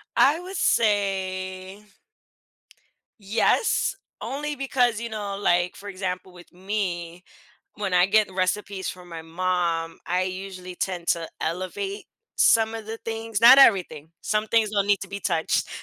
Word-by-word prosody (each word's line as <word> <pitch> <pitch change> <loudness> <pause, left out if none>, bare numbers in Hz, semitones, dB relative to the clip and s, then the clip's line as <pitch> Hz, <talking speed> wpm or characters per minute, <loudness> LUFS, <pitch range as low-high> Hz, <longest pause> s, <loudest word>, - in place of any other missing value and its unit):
I 295 +4 +4
would 370 +2 -8
say 190 - 0 1.4
yes, 215 - +1 0.3
only 295 +2 -4
because, 250 -4 +1
you 235 0 -5
know, 205 -2 -4
like, 175 -2 +1
for 205 0 -9
example, 185 -1 -5
with 175 -1 -15
me, 180 -3 -4 0.5
when 200 -3 -3
I 180 0 +5
get 210 0 +3
recipes 190 +1 -1
from 180 -1 -10
my 165 -1 -7
mom, 165 -1 -1
I 180 +1 +1
usually 185 -1 -6
tend 175 -2 -3
to 165 -1 0
elevate 185 - -3 0.3
some 225 0 +4
of 225 -1 -7
the 225 +1 -5
things 225 -1 -3
not 250 +4 +9
everything, 175 - +4
some 215 0 -1
things 220 -1 +2
don't 200 -1 +1
need 205 -2 +3
to 195 - -6
be 200 - -6
touched. 160 -4 0
195 Hz, 145 wpm, -25 LUFS, 180-220 Hz, 1.4 s, not